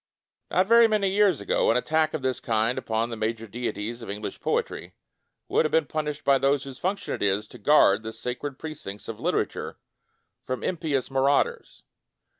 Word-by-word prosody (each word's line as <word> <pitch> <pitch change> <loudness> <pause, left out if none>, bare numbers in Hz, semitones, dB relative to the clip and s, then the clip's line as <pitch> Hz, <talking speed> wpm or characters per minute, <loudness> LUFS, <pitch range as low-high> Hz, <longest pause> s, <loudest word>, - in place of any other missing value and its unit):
Not 185 +3 +3
very 230 +2 +7
many 210 -3 +1
years 195 -5 +3
ago, - - +1
an 115 - +4
attack 155 +4 +1
of 150 - -4
this 130 -1 0
kind 115 +1 0
upon 115 +1 -2
the - - -3
major 110 +1 -2
deities 115 0 -4
of 115 - -8
English 105 +1 -5
poetry - - -2 0.5
would - - +2
have 155 - -1
been 160 -2 +3
pun 155 +1 -3
ished 150 0 -5
by 140 -1 +4
those 140 0 +2
whose 135 -2 -9
function 195 +2 -2
it - - -5
is 100 +1 +1
to - - -12
guard 145 -9 +5
the 110 0 -6
sacred 130 +4 -5
precincts 145 -11 -7
of 110 -2 -6
litera - - +1
ture - - -8 0.7
from 130 0 -4
impious 150 -7 -1
marauders. 140 - 0
135 Hz, 190 wpm, -26 LUFS, 115-155 Hz, 0.7 s, very